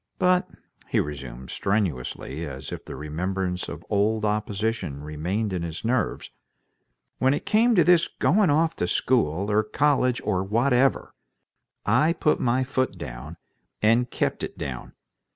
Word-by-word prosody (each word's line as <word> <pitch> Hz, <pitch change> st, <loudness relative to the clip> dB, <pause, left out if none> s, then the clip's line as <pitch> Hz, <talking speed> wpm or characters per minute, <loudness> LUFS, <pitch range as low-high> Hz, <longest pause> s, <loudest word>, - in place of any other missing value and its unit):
But," 180 Hz, +1 st, +2 dB, 0.4 s
he -, -, +1 dB
resumed, 65 Hz, -3 st, -5 dB
strenuously, 85 Hz, -, -2 dB
as 65 Hz, -1 st, -7 dB
if -, -, -6 dB
the -, -, -7 dB
remembrance 90 Hz, +4 st, -3 dB
of -, -, -8 dB
old 105 Hz, +2 st, +1 dB
opposition 105 Hz, -7 st, -2 dB
remained 90 Hz, +8 st, -2 dB
in 90 Hz, -, -2 dB
his 85 Hz, +4 st, -5 dB
nerves, 120 Hz, 0 st, -1 dB, 0.9 s
"when 130 Hz, +2 st, +3 dB
it -, -, -5 dB
came 230 Hz, +2 st, +4 dB
to 175 Hz, -, +6 dB
this 170 Hz, 0 st, +5 dB
going 195 Hz, +1 st, +2 dB
off 160 Hz, +3 st, +2 dB
to 90 Hz, -, 0 dB
school, 100 Hz, -3 st, +1 dB
or 105 Hz, +1 st, +4 dB
college, 130 Hz, +1 st, +2 dB
or 95 Hz, -3 st, 0 dB
whatever, 125 Hz, +6 st, +2 dB, 0.7 s
I 160 Hz, +2 st, +3 dB
put 150 Hz, -, +1 dB
my 125 Hz, +2 st, +2 dB
foot 130 Hz, 0 st, -1 dB
down, 65 Hz, +6 st, -8 dB, 0.4 s
and 115 Hz, +3 st, +3 dB
kept -, -, -1 dB
it -, -, -5 dB
down. 65 Hz, -2 st, -6 dB
105 Hz, 145 wpm, -25 LUFS, 85-130 Hz, 0.9 s, to